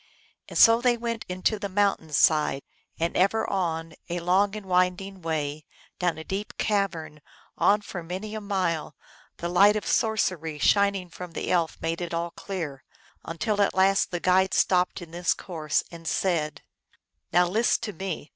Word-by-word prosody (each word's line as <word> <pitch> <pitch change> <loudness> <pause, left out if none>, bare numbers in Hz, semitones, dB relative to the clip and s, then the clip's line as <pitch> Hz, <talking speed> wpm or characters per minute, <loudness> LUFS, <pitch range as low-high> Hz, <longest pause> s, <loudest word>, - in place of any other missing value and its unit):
And - - -5
so 230 0 +7
they 240 -1 +3
went 230 -1 -4
into 185 +4 0
the 200 - -4
mountain 195 -5 0
side, 150 -1 +3 0.4
and 165 +1 -1
ever 200 +4 +2
on, 165 -4 -2 0.2
a 175 +1 -2
long 190 +4 +2
and 210 -2 -7
winding 185 +1 0
way, 155 -2 -3 0.4
down 175 -3 0
a 160 - -7
deep 195 +5 -5
cavern, 170 -8 -1 0.3
on 210 +1 +3
for 190 -3 -7
many 185 +6 -6
a 215 - -4
mile, 180 -7 -2 0.4
the 170 - -3
light 200 +4 +5
of 215 - -2
sorcery 185 -8 0
shining 200 +2 +2
from 180 0 -9
the - - -3
elf 170 -3 +1
made 165 +1 -2
it 170 -1 -3
all 170 0 -2
clear, 165 -10 -6 0.4
until 205 +5 -1
at 200 - +2
last 195 +1 +3
the 175 - -3
guide 185 +1 +3
stopped 180 0 +2
in 165 -1 -13
his 175 +1 +1
course, 155 -5 -2
and 165 -1 -9
said: 155 -7 -1 0.3
" - - -55
Now 180 +1 +5
list 225 +6 +1
to 210 -2 -4
me. 175 -3 -5
180 Hz, 175 wpm, -26 LUFS, 165-200 Hz, 0.4 s, so